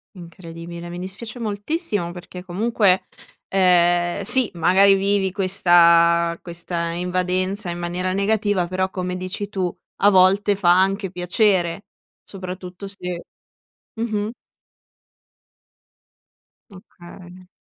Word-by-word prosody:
Incredibile, 170 -1 -10
mi 175 +1 -7
dispiace 205 +6 -8
moltissimo, 210 - -3
perché 180 +1 -10
comunque, 195 0 +1 0.5
ehm, 175 -1 +3
sì 245 +3 +3
magari 190 +4 +5
vivi 195 0 0
questa 170 -3 +4
questa 170 -1 -4
invadenza 185 +2 -2
in 170 - -4
maniera 175 +2 -2
negativa 205 -2 0
però, 185 +1 -1
come 180 -1 -4
dici 185 +2 -5
tu, 185 -3 -3 0.2
a 205 - +5
volte 195 +2 +4
fa 180 -3 +3
anche 195 0 0
piacere, 180 0 +1 0.4
soprattutto 185 0 -8
se 180 -3 -6 0.8
mh-mh 215 -2 -2 2.4
Okay. 180 -1 -14
185 Hz, 100 wpm, -21 LUFS, 175-200 Hz, 2.4 s, magari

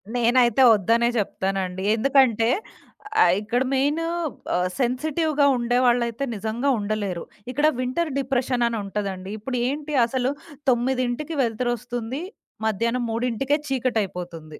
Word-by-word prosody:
నేనైతే 240 0 +3
ఒద్దనే 230 +4 +2
జెప్తానండి. 190 -2 -2
ఎందుకంటే 235 -2 +3 0.7
ఆహ్, 175 - +5
ఇక్కడ 235 +4 -1
మెయిను 290 +5 +1 0.5
ఆహ్, 180 +1 +1
సెన్సిటివ్‌గా 290 +4 +1
ఉండేవాళ్ళైతే 240 0 +1
నిజంగా 220 +6 -1
ఉండలేరు. 205 -4 -2 0.3
ఇక్కడ 295 +4 +2
వింటర్ 255 +7 -1
డిప్రెషన్ 260 -2 0
అని 235 -1 -2
ఉంటదండి. 195 -2 -4
ఇప్పుడు 250 +4 -4
ఏంటి 295 +3 -4
అసలు 250 +1 -1 0.4
9కి 255 +4 0
వెలుతురొస్తుంది. 240 +2 -3 0.4
మధ్యాహ్నం 230 +3 0
మూడింటికే 250 +5 0
చీకటయిపోతుంది. 180 - -3
240 Hz, 105 wpm, -24 LUFS, 215-260 Hz, 0.7 s, ఆహ్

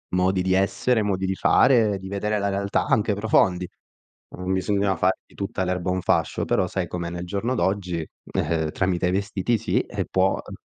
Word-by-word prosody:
modi 95 +1 +2
di 95 0 +1
essere, 100 +5 +2
modi 95 -2 -1
di 95 0 -1
fare, 110 -4 +4
di 95 - -8
vedere 105 +2 -1
la 100 0 0
realtà 100 +1 0
anche 105 -1 +2
profondi. 95 -4 +2 0.7
Non 90 +1 -2
bisognava 100 +1 +1
fare 95 +1 +1
di - - -24
tutta 95 -1 -3
l'erba 90 0 -1
un 95 0 0
fascio, - - 0
però 90 - +1
sai 90 -1 -2
com'è 85 0 -4
nel 85 0 -5
giorno 100 +8 -2
d'oggi, 90 -6 -1 0.3
ehm, 80 0 0
tramite 90 0 0
i - - +1
vestiti 100 +4 0
sì, 110 - 0 0.3
può 95 +1 +2
eh - - -9
95 Hz, 185 wpm, -24 LUFS, 90-100 Hz, 0.7 s, fare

